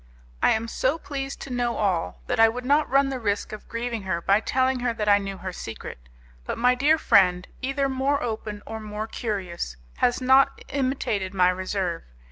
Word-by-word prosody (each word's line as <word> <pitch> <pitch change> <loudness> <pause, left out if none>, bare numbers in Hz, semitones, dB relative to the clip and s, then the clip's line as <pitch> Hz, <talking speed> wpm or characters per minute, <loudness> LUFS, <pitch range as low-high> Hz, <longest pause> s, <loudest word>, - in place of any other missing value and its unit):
I - - +5
am 225 +1 -2
so 260 +6 0
pleased 275 -3 -5
to 275 - -7
know 240 -1 0
all 165 - -1
that - - -1
I 225 0 +7
would 250 +2 -5
not 290 +3 +3
run 275 +1 +3
the 265 -1 -3
risk 205 -3 -1
of 215 - -9
grieving 230 -1 -3
her 190 -3 -2
by 195 +4 +3
telling 260 +2 +1
her 245 -1 -1
that 210 -2 -2
I 205 0 +6
knew 195 -1 -5
her 185 0 -6
secret, 115 - -7 0.4
but - - -4
my 250 +1 +4
dear 290 +5 +3
friend, 180 - +4
either 275 +1 0
more 270 +2 0
open 215 -2 -4
or 220 0 -6
more 215 0 -5
curious, 185 - -4 0.2
has 245 - +2
not 265 +1 +4
imitated 255 -8 -1
my 180 -1 +5
reserve. 185 -2 -2
225 Hz, 195 wpm, -25 LUFS, 195-260 Hz, 0.4 s, I